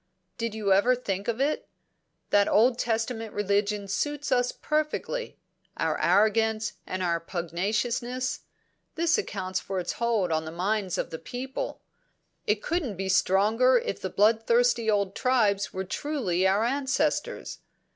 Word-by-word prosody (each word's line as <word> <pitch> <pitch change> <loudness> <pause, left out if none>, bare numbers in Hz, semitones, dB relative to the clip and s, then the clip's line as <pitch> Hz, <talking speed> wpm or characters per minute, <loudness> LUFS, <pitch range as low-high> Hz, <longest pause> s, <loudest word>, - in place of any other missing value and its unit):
Did 230 -2 -2
you 205 -3 +2
ever 235 +6 +4
think 200 -5 -4
of 235 0 -1
it? 285 +3 0 0.6
That 205 0 +5
Old 240 +3 +4
Testament 225 -1 -2
religion 205 0 0
suits 290 +8 -2
us 245 -1 +2
perfectly 310 +11 -2 0.4
our - - 0
arrogance 220 +1 +2
and 185 0 -3
our 170 -1 +1
pugnaciousness; 210 +9 -2 0.6
this 335 +3 +2
accounts 185 - -3
for 190 0 -4
its 175 - -2
hold 225 -7 0
on 160 0 0
the 160 - -6
mind 190 +2 -1
of - - -3
the 160 - -5
people; 260 - -5 0.7
it 210 0 +1
couldn't 300 - -2
be 190 0 -3
stronger 210 +6 +4
if 210 - -3
the 190 - -3
bloodthirsty 230 +3 +3
old 200 -2 +1
Tribes 215 -6 +1
were 190 - -3
truly 190 - 0
our 200 +3 +2
ancestors. 285 +4 -1
220 Hz, 140 wpm, -27 LUFS, 195-250 Hz, 0.7 s, That